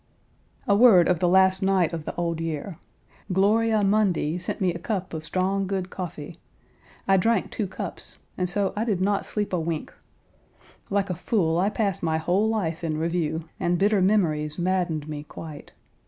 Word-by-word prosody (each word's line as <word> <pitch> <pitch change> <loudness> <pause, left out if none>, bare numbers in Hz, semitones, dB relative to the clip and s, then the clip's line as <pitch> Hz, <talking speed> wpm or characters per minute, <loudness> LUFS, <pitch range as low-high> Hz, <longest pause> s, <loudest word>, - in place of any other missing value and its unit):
A 200 - +4
word 205 -6 +7
of 180 -3 +2
the 180 - +2
last 190 +1 +4
night 190 -4 +2
of 160 -2 -5
the - - -5
old 170 -1 -2
year. 165 +2 -4 0.5
"Gloria 215 +3 +3
Mundi" 195 -5 +1
sent 180 - -4
me 185 -3 +1
a 170 - -6
cup 190 -1 -3
of 160 -1 -5
strong, 190 +4 -1
good 190 -1 -3
coffee. 170 -2 -7 0.7
I 195 0 +5
drank 225 +1 +1
two 210 - -2
cups 190 - -7 0.2
and 180 -1 -1
so 195 +1 0
I 210 - 0
did 210 -6 0
not 200 +1 0
sleep 205 -2 -3
a 180 - +1
wink. 160 -1 -3 1.0
Like 200 -1 0
a - - -2
fool 170 -3 0
I 195 +3 +2
passed 205 -4 -1
my 160 -1 0
whole 180 +7 +1
life 175 -7 -2
in 155 -2 -1
review, 165 -1 -2
and 175 0 +1
bitter 200 +1 +3
memories 155 -7 +1
maddened 175 -4 -1
me 150 -1 -5
quite. 150 0 -10
180 Hz, 180 wpm, -25 LUFS, 165-200 Hz, 1.0 s, word